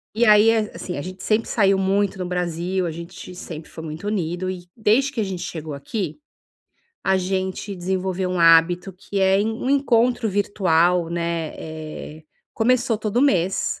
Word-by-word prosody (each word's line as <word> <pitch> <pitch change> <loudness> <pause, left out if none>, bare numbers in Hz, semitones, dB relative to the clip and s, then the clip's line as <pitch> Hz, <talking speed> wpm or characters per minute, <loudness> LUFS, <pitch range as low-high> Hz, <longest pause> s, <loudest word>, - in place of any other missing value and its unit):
E 240 - +3
aí, 210 0 +7
é 225 - +3
a 215 - -4
assim, 180 - -5
a 145 - -3
gente 185 +2 -8
sempre 220 +1 +1
saiu 195 -3 +3
muito 195 0 +1
no 185 - -2
Brasil, 180 +1 -2
a 170 - -2
gente 170 +3 -9
sempre 165 -3 -8
foi 160 - -8
muito 160 +4 -7
unido 185 -3 -2
e, 180 -1 -6
desde 230 +6 +3
que 265 - -5
a 220 - +2
gente 190 -3 -4
chegou 160 -5 -5
aqui, 195 - -4 0.9
a 190 0 +3
gente 190 +1 -2
desenvolveu 185 +1 -2
um 180 -1 -1
hábito, 165 +3 +5
que 195 +2 -4
é 190 0 +4
en 220 +2 0
um 250 +4 -3
encontro 245 -4 +2
virtual, 180 -4 +2
né, 170 -1 -2
eh, 155 0 -8 0.3
começou 230 -1 +2
todo 220 +3 0
mês 190 -9 +1
185 Hz, 180 wpm, -22 LUFS, 170-210 Hz, 0.9 s, aí